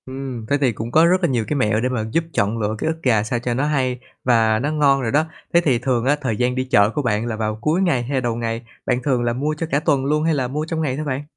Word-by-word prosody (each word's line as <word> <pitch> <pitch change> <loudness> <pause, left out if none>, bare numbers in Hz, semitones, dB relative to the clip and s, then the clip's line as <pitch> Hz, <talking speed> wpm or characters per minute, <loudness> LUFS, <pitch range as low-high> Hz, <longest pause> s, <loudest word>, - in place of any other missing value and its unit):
Ừm, 130 -3 -6
thế 145 - +3
thì 130 -3 +3
cũng 115 +2 -6
có 160 +4 +5
rất 180 +2 +2
là 170 - +3
nhiều 120 -4 0
cái 150 - -1
mẹo 110 -5 +1
để 125 - 0
mà 115 -4 -2
giúp 165 - +1
chọn 105 -1 0
lựa 105 0 -1
cái - - -3
ức 160 0 -2
gà 110 -5 +3
sao 120 +2 -2
cho 120 0 -2
nó 135 +4 0
hay 130 -4 0 0.2
và 110 -3 +3
nó 145 +5 -1
ngon 140 -3 +3
rồi 115 -3 -1
đó. 155 +2 +2 0.3
Thế 170 - +5
thì 130 -8 +2
thường 125 -2 0
á, 145 +2 +3
thời 120 -6 -1
gian 125 0 0
đi 130 - 0
chợ 100 -5 +3
của 145 - -2
bạn 115 -4 0
là 120 -2 -3
vào 110 -1 -2
cuối 155 +8 +1
ngày 165 -10 +1
hay 130 +1 -1
đầu 120 -2 -1
ngày, 115 0 -3 0.2
bạn 125 0 0
thường 125 -3 +1
là 120 0 0
mua 145 +5 -1
cho 165 - -3
cả 140 - +3
tuần 140 -3 +1
luôn 150 +2 +1
hay 165 0 +2
là 135 -4 0
mua 150 +4 -3
trong 160 0 -3
ngày 135 -5 -1
thôi 155 - -3
bạn? 140 0 -2
130 Hz, 310 wpm, -21 LUFS, 115-145 Hz, 0.3 s, có